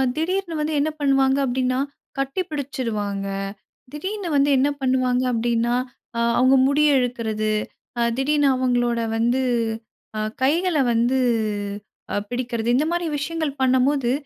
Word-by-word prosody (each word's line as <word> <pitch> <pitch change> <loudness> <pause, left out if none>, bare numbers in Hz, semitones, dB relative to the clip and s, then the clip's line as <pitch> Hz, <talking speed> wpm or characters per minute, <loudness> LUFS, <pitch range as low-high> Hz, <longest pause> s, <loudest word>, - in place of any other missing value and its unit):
திடீர்னு 345 +1 -1
வந்து 305 +1 -1
என்ன 305 +2 +1
பண்ணு 275 -1 +2
வாங்க 265 +1 +3
அப்படின்னா, 255 0 0 0.4
கட்டி 275 +7 -1
பிடிச்சிடுவாங்க. 225 -9 -3 0.6
திடீர்னு 375 +4 -4
வந்து 280 +1 +4
என்ன 275 +3 +3
பண்ணுவாங்க 255 -1 +1
அப்படின்னா, 235 +1 +1 0.4
அ - - 0 0.2
அவங்க 260 +2 +5
முடிய 290 0 +4
இழுக்கிறது, 220 -3 -1 0.5
அ - - +2 0.2
திடீர்னு 290 +1 +2
அவங்களோட 245 -2 +1 0.2
வந்து 240 +3 +2 0.8
அ - - -1 0.2
கைகள 335 +5 +2 0.2
வந்து 240 +3 +2 1.0
அ - - 0 0.2
பிடிக்கறது, 240 -2 -2
இந்த 300 +5 +2
மாரி 345 -1 -1
விஷயங்கள் 310 0 -2
பண்ணும்போது, 260 0 +2
260 Hz, 125 wpm, -22 LUFS, 240-295 Hz, 1.0 s, அவங்க